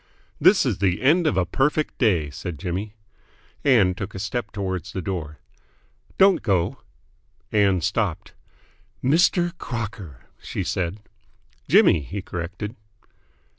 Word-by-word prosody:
"This - - +5
is - - -1
the 90 -2 +1
end 160 +5 +4
of 150 - +1
a 90 - +2
perfect 145 - 0
day!" 85 - +2
said 85 +1 -6
Jimmy. 95 +7 -4 0.7
Ann 115 -10 +4
took 100 +2 -7
a - - -4
step 105 +3 -3
towards 95 -3 -4
the 95 - -3
door. 80 -5 -4 0.8
"Don't 190 -2 +5
go!" 100 +3 0 0.7
Ann 100 -4 +3
stopped. - - -2 0.7
"Mr. 175 +5 +3
Crocker!" 110 - -6 0.2
she - - -4
said. 90 +3 -2 0.7
"Jimmy," - - +6
he 95 +7 -6
corrected. 90 +6 -5
100 Hz, 125 wpm, -23 LUFS, 90-125 Hz, 0.8 s, Jimmy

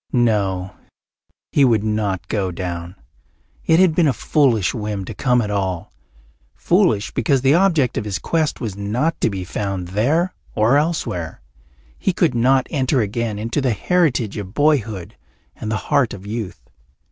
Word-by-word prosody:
No, 100 -6 +1 0.8
he 145 - +4
would 115 -5 +3
not 105 -4 -1
go 100 -4 -1
down. 85 0 -5 0.7
It 160 +1 +5
had 185 -3 +5
been 165 -1 +3
a 135 - +2
foolish 120 - +2
whim 105 -4 -4
to 115 - -6
come 125 +2 +2
at 105 - -3
all 95 -4 -2 0.6
foolish, 170 - +2
because 135 -3 +1
the 135 +2 +4
object 165 -8 +2
of 105 - -6
his 100 -2 -2
quest 155 - -1
was 110 -6 -4
not 115 +11 -1
to - - +3
be 95 -3 -4
found 95 -1 -4
there 145 - +1 0.2
or 110 +5 +3
elsewhere. 145 - -2 0.6
He 190 - 0
could 170 -5 +2
not 130 +2 +3
enter 130 -3 +1
again 110 +1 -2
into 115 +7 -2
the 130 -3 +1
heritage 130 - +1
of 100 -2 -7
boyhood 115 - 0 0.4
and 110 - -6
the 110 - 0
heart 140 -7 +2
of 100 0 -12
youth. 110 -2 -5
115 Hz, 160 wpm, -20 LUFS, 100-145 Hz, 0.8 s, It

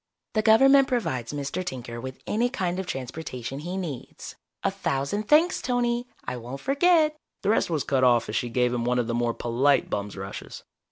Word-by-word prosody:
"The 215 - +2
Government 270 +5 +6
provides 160 - -1
Mr. 145 +5 -3
Tinker 120 -7 -6
with 130 +1 -8
any 235 +3 +1
kind 185 -7 -2
of 190 - -4
transportation 135 -2 -5
he 175 +5 -4
needs. 160 -9 -6 0.3
A - - +2
thousand 140 +11 -2
thanks, 320 +4 +4
Tony. 245 -1 0 0.2
I 125 - -3
won't 125 +3 -7
forget 305 - +3
" - - -56
The 200 - +1
rest 215 - +2
was 155 -5 0
cut 135 -2 +1
off 120 -2 +4
as 105 - -4
she 120 +2 0
gave 125 +1 +1
him 120 -1 -1
one 125 +1 +1
of 120 - +1
the 115 - -2
more 120 0 0
polite 130 +4 +2
bum's 100 0 -3
rushes. 95 +1 -7
140 Hz, 200 wpm, -26 LUFS, -, 0.3 s, Government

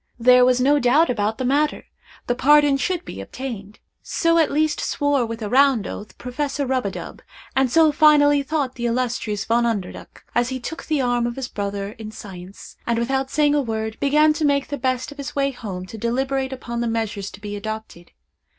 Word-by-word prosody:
There 250 +1 +6
was 250 0 +4
no 285 +3 +4
doubt 280 +5 +3
about 220 -1 -1
the 260 - -2
matter—the 285 -2 -2
pardon 290 +2 +4
should 350 +6 -2
be - - -7
obtained. 215 -6 -7 0.2
So 335 -2 +1
at 320 - +3
least 305 +1 +1
swore, 285 -4 0
with 225 0 -6
a - - -2
round 265 -2 +4
oath, 210 - -8
Professor 280 +3 -3
Rub 255 -4 0
a - - -1
dub, - - -8 0.3
and 265 -1 +3
so 320 +3 +5
finally 290 -1 +5
thought 280 -2 -2
the 240 -2 -3
illustrious 230 -4 -2
Von 235 +1 +2
Underduk, 215 -6 -4
as 240 +1 +1
he 260 -1 -4
took 320 +6 -7
the 305 -3 +1
arm 245 -1 +1
of 240 - -4
his 265 -2 -5
brother 200 0 -4
in 215 -1 -7
science, 190 -3 -11
and 235 -1 +1
without 265 +3 -1
saying 295 0 +2
a 295 - +2
word, 220 -3 -4
began 300 +2 +4
to 310 - -3
make 280 -1 +1
the 285 - -3
best 255 0 -1
of 285 - -13
his 280 - -6
way 275 -1 +1
home 195 -8 -7
to 220 +4 -9
deliberate 265 +3 -1
upon 235 -2 -5
the 235 - -1
measures 225 -3 -2
to - - -13
be 205 0 -6
adopted. 215 -4 -7
250 Hz, 205 wpm, -22 LUFS, 225-285 Hz, 0.3 s, There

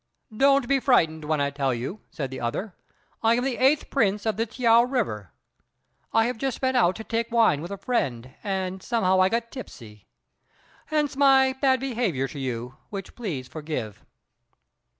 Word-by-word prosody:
"Don't 275 +1 +4
be 275 +1 +3
frightened 160 - +2
when 155 0 0
I 140 0 0
tell 135 -2 0
you," 130 - -5
said 135 -3 -5
the 130 -1 -6
other; 175 - -3 0.5
"I 225 +1 +4
am 245 - 0
the 265 -2 -1
Eighth 275 +4 +2
Prince 210 -6 +1
of 220 -2 +1
the 225 +3 -1
T'iao 230 0 +4
river. 105 - -2 0.8
I 225 0 +3
have 240 -1 -3
just 270 -1 -2
been 260 -1 0
out 185 -7 +3
to 220 - -7
take 230 +1 -2
wine 225 -11 +3
with 170 - -6
a 200 - -5
friend, 130 - -2
and 190 -2 -3
somehow 190 -5 +2
I 185 - +4
got 230 +1 -2
tipsy; 110 - -11 0.8
hence 300 -3 0
my 270 -1 +5
bad 265 -1 +2
behaviour 230 - -1
to 145 - -8
you, 125 -1 -4
which 195 -2 -7
please 165 - -5
forgive." 150 -10 -6
215 Hz, 175 wpm, -25 LUFS, -, 0.8 s, my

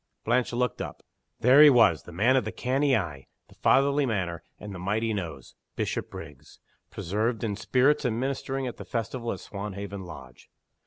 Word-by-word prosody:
Blanche 120 +2 +1
looked 125 +1 -1
up. - - -7 0.4
There 130 +5 +7
he 150 - +10
was 115 - +5
the - - -12
man 110 +10 +3
of 130 - +3
the 110 - -4
canny 135 +2 +1
eye, 75 -9 -5 0.2
the - - -17
fatherly 140 +1 +3
manner, 90 -7 -2 0.2
and 105 -1 -8
the 90 - -7
mighty 110 +5 0
nose 80 - -6 0.2
Bishopriggs 75 -2 -5 0.3
preserved 110 +6 -2
in 105 -3 -1
spirits 130 +7 +2
and 115 -2 0
ministering 135 0 -2
at 125 - -5
the - - -7
festival 115 +1 -3
at - - -6
Swanhaven 100 -1 -6
Lodge! 70 -8 -12
110 Hz, 170 wpm, -27 LUFS, 95-125 Hz, 0.4 s, he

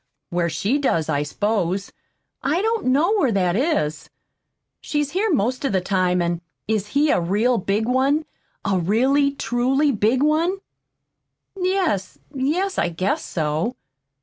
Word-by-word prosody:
Where 170 -1 0
she 195 - 0
does, 165 - 0
I 145 - +1
s'pose. 195 +4 -1 0.5
I 310 +9 0
don't 450 - 0
know 300 +10 +3
where 270 -10 +2
that 180 -2 +1
is. 225 - -1 0.7
She's 295 -2 -1
here 405 +4 0
most 255 - 0
of 275 - 0
the 190 - +3
time, 180 -1 +1
and 170 0 -2
" - - -57
"Is 210 -2 0
he 295 0 +4
a - - +2
real 215 +8 +1
big 200 +3 0
one? 275 +5 +2 0.4
a 195 -2 +1
really, 265 - +2
truly 270 +3 +1
big 235 +4 +2
one?" 325 +5 +2 1.0
"Yes, 365 - -1 0.2
yes, 325 +9 0
I 175 - +1
guess 185 +4 -1
so." 160 +8 -2
240 Hz, 150 wpm, -22 LUFS, 185-295 Hz, 1.0 s, he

